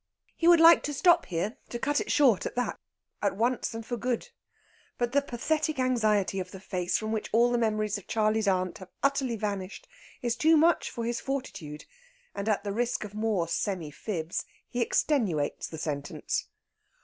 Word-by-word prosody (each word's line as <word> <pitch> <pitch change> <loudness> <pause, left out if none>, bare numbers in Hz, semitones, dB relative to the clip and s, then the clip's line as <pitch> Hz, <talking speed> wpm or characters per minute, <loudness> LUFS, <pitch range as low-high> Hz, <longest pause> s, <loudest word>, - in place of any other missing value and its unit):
He 335 - +1
would 345 -1 +8
like 330 +1 +8
to 295 - -3
stop 345 +2 +4
here 185 +6 -2
to 240 - -4
cut 290 +4 0
it - - -3
short 250 - +4
at - - -8
that, 245 0 -2 0.4
at 200 -2 +1
once 240 +1 0
and 225 0 -6
for 240 - -3
good. 250 - -2 0.7
But 240 -1 0
the 285 +2 +3
pathetic 300 +4 -1
anxiety 215 -7 +1
of 185 -1 -4
the 190 - -10
face 185 -2 -1
from 215 0 -4
which 220 -1 -2
all 240 +2 +4
memories 215 -3 0
of 195 - -18
"Charley's 215 -1 +1
Aunt" 185 -2 0
have 185 -1 -11
utterly 275 -3 +1
vanished 200 -3 -4 0.4
is 240 -1 0
too 315 +6 +4
much 330 +2 +3
for 235 - -4
his 235 0 -2
fortitude; 195 - -5 0.5
and, 200 +2 -3
at 200 -2 +1
the 200 -1 -3
risk 240 +2 -1
of 210 -1 -8
more 215 -5 0
semi 170 -2 -2
fibs, 170 0 -4 0.2
he 245 - -3
extenuates 215 - 0
the 160 - -8
sentence. 145 -2 -3
220 Hz, 185 wpm, -28 LUFS, 195-255 Hz, 0.7 s, would